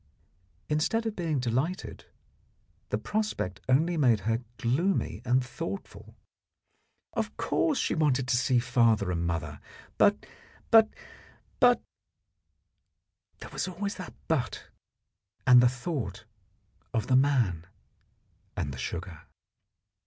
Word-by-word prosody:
Instead 160 +10 0
of 220 -2 -2
being 165 -4 -1
delighted, 130 +10 -2 0.8
the - - 0
prospect 210 - -2
only 160 +7 +3
made 120 -8 +3
her 115 +3 0 0.2
gloomy 130 - 0
and 125 +1 +2
thoughtful. 165 +9 -7 1.0
Of - - -3
course 305 -4 +1
she - - 0
wanted 135 -5 +1
to 130 - +3
see 125 +1 +2
father 115 -5 +2
and 85 -1 -1
mother, 75 -3 -3 0.4
but - - +4 0.5
but 225 -1 +7 0.7
but 245 -1 +5 1.6
There - - -9
was - - -2
always 200 +3 -3
that 185 - -8
'but' 135 -7 -2 0.8
and 125 -1 +8
the 125 - +5
thought 125 - -4 0.7
of 110 -2 +1
the 130 - +2
man 120 - +2 0.9
and 70 - -2
the 65 - -8
sugar. 85 -2 -6
130 Hz, 115 wpm, -28 LUFS, 110-170 Hz, 1.6 s, and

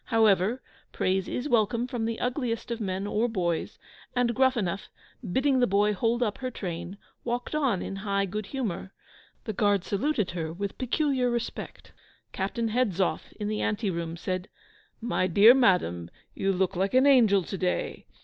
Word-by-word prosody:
However, 220 +2 +3 0.3
praise 190 0 0
is 250 - -3
welcome 235 -1 +2
from 245 -3 -3
the 225 0 -2
ugliest 245 -2 -2
of 235 -1 -3
men 190 -1 -2
or 215 +3 0
boys, 175 -6 -2 0.4
and 245 -1 +2
Gruffanuff, 235 -8 +1 0.4
bidding 265 +4 +2
the 245 - +4
boy 205 +2 +3
hold 230 +4 +1
up 210 -3 -2
her 255 -1 -3
train, 175 -4 -6 0.3
walked 245 +3 -3
on 270 -11 +1
in 195 - -5
high 200 0 0
good 205 +2 -4
humour. 195 -8 -4 0.5
The 220 - -4
Guards 205 -3 +2
saluted 220 -1 0
her 165 -2 -3
with 200 +4 -5
peculiar 260 0 +1
respect. 240 -1 -5 0.4
Captain 225 +4 -2
Hedzoff, 200 -8 0
in 210 - -5
the 215 0 -2
anteroom 175 -6 -2
said, 185 +2 -3 0.5
"My 230 -5 0
dear 205 +7 +8
madam, 180 - +2 0.2
you 195 - 0
look 190 0 0
like 195 +6 0
an 260 +2 +6
angel 225 -9 +5
to 195 - -5
day." 180 -1 -2
210 Hz, 160 wpm, -27 LUFS, 190-245 Hz, 0.5 s, dear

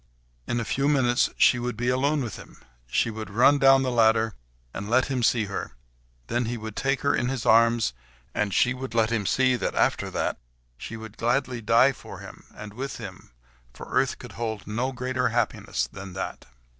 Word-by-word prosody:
In 120 - -1
a 115 - -3
few 135 +5 0
minutes 130 -4 +3
she 125 - +5
would 120 -2 -3
be 120 +1 0
alone 140 +3 +1
with 115 -5 -5
him; - - -13 0.3
she 115 - +1
would 110 -2 -7
run 125 +7 +4
down 135 0 +6
the 130 - -1
ladder, 110 -1 +3 0.4
and 100 +2 -6
let 130 +4 +3
him 130 -2 -1
see 115 -2 +2
her; 100 -9 -5 0.5
then 120 +1 -1
he 120 +2 -3
would 110 -1 -7
take 135 0 0
her 140 - +2
in 120 - 0
his 130 -3 -3
arms, 115 - +4 0.4
and 105 -1 -1
she 125 +6 +3
would 130 -2 -7
let 110 -1 +2
him 110 -4 0
see 130 -1 +3
that, 105 - -3
after - - +1
that, - - -2 0.4
she 115 - -8
would 110 -1 -10
gladly 125 +1 0
die 115 +5 +5
for - - -11
him, - - -12
and 105 -1 -9
with 135 +4 -5
him, 95 -5 -10 0.5
for - - -9
earth - - +1
could - - -11
hold 110 -4 -4
no 120 +6 -2
greater 125 0 -1
happiness 115 -1 -1
than 95 -1 -8
that. 95 - -6
120 Hz, 200 wpm, -26 LUFS, 110-130 Hz, 0.5 s, down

